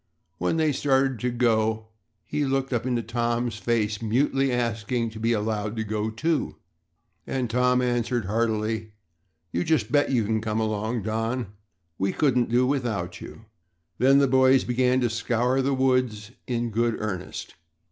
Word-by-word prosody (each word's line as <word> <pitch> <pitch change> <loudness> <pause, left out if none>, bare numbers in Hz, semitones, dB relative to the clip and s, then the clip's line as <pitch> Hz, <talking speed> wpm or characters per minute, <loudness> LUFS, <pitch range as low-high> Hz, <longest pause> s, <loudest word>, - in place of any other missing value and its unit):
When 90 - 0
they 155 -1 +2
started 135 -2 +1
to 125 - 0
go 110 -2 +1 0.4
he 150 - -1
looked 135 -1 -1
up 120 +1 -1
into 120 -2 0
Tom's 120 0 -1
face, 110 -2 0
mutely 135 +4 +1
asking 115 -1 -1
to 110 - -9
be 115 +1 +1
allowed 110 -1 -1
to 110 - -2
go 110 0 -2
too. 155 +8 -1 0.7
And 130 -2 -1
Tom 125 +1 +2
answered 120 -2 0
heartily, 110 0 -1 0.6
"You - - 0
just 160 -3 +1
bet 145 -1 +3
you 120 -5 +1
can 110 +1 0
come 110 0 -1
along, 110 +1 -1
Don. 115 0 -2 0.5
We 95 0 0
couldn't 125 -5 +2
do 125 +2 +3
without 115 -10 -2
you." 115 - -11 0.5
Then 135 +3 +5
the 140 0 +4
boys 130 0 +4
began 125 +1 +2
to 120 - +2
scour 120 +3 +1
the 135 +1 +1
woods 125 -5 0 0.2
in 120 -1 -1
good 115 +1 +1
earnest. 95 -4 -5
120 Hz, 155 wpm, -25 LUFS, 110-130 Hz, 0.7 s, Then